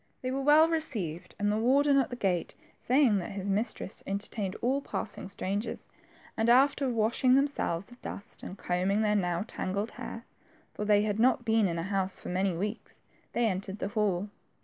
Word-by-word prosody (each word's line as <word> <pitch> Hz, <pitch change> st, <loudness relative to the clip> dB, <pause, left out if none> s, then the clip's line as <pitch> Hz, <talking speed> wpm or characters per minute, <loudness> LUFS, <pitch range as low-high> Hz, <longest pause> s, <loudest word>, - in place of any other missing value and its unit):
They 255 Hz, -, -1 dB
were 270 Hz, +1 st, -1 dB
well 300 Hz, +3 st, +6 dB
received, 220 Hz, -, -3 dB
the 205 Hz, +1 st, +1 dB
warden 275 Hz, +4 st, +4 dB
at 265 Hz, -, +1 dB
the 245 Hz, -, -5 dB
gate 185 Hz, -7 st, -1 dB, 0.2 s
saying 250 Hz, -5 st, +3 dB
that 175 Hz, -, -5 dB
his 195 Hz, 0 st, -3 dB
mistresses 205 Hz, -1 st, -2 dB
entertained 200 Hz, 0 st, -2 dB
all 265 Hz, +4 st, +1 dB
passing 275 Hz, -, -5 dB
strangers, 200 Hz, +2 st, -3 dB, 0.5 s
and 225 Hz, +1 st, +1 dB
after 270 Hz, +2 st, +4 dB
washing 235 Hz, +2 st, +3 dB
themselves 265 Hz, -9 st, 0 dB
of 245 Hz, -, -15 dB
dust 200 Hz, -, -8 dB
and 190 Hz, -, -8 dB
combing 190 Hz, +5 st, 0 dB
their 210 Hz, -1 st, +2 dB
now 180 Hz, -1 st, 0 dB
tangled 200 Hz, +2 st, -3 dB
hair, 230 Hz, +1 st, -8 dB, 0.5 s
for 210 Hz, -, -4 dB
they 205 Hz, 0 st, +4 dB
had 210 Hz, 0 st, -1 dB
not 245 Hz, +1 st, +3 dB
been 220 Hz, -2 st, +3 dB
in 170 Hz, -1 st, -2 dB
a 165 Hz, -, -2 dB
house 190 Hz, 0 st, 0 dB
for^ -, -, -6 dB
many 185 Hz, -1 st, 0 dB
weeks, 210 Hz, +5 st, -5 dB, 0.4 s
they 240 Hz, -, +2 dB
entered 195 Hz, -1 st, -2 dB
the 200 Hz, -, -3 dB
hall. 205 Hz, -2 st, 0 dB
210 Hz, 180 wpm, -29 LUFS, 195-245 Hz, 0.5 s, well